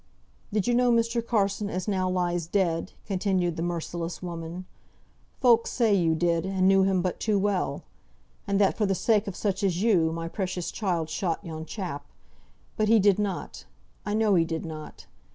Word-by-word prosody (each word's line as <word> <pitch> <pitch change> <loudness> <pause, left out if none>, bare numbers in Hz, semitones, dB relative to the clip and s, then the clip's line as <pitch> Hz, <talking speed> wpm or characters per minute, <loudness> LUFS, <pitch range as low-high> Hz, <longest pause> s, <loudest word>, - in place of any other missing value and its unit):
"Did 210 -2 0
you 240 - +2
know 245 0 +4
Mr. 230 0 +1
Carson 205 -2 0
as 185 +1 -4
now 185 -3 0
lies 175 -2 -1
dead?" 175 -2 0
continued 185 -3 0
the 165 - -4
merciless 170 0 -3
woman. 170 +1 -6 0.7
"Folk 235 -3 +4
say 230 -4 +2
you 170 -4 +3
did, 170 0 +1
and 190 0 +1
knew 195 0 +5
him 190 -2 +2
but 180 - -2
too 215 -2 +1
well. 200 -1 -1 0.6
And 200 0 +1
that 195 -2 +3
for 210 - +1
the 195 - +1
sake 210 +2 +2
of 195 - -4
such 200 -1 -2
as 185 -1 +1
you, 175 -8 +3
my 165 0 -4
precious 185 -1 -3
child 170 -6 -2
shot 180 0 -2
yon 160 -1 -6
chap. 180 -9 -5 0.7
But 215 - +2
he 225 +1 +6
did 205 -1 +4
not. 205 -2 -4 0.4
I 205 - -2
know 215 -2 +3
he 170 -3 +4
did 165 0 -4
not. 155 -2 -8
190 Hz, 185 wpm, -27 LUFS, 170-205 Hz, 0.7 s, he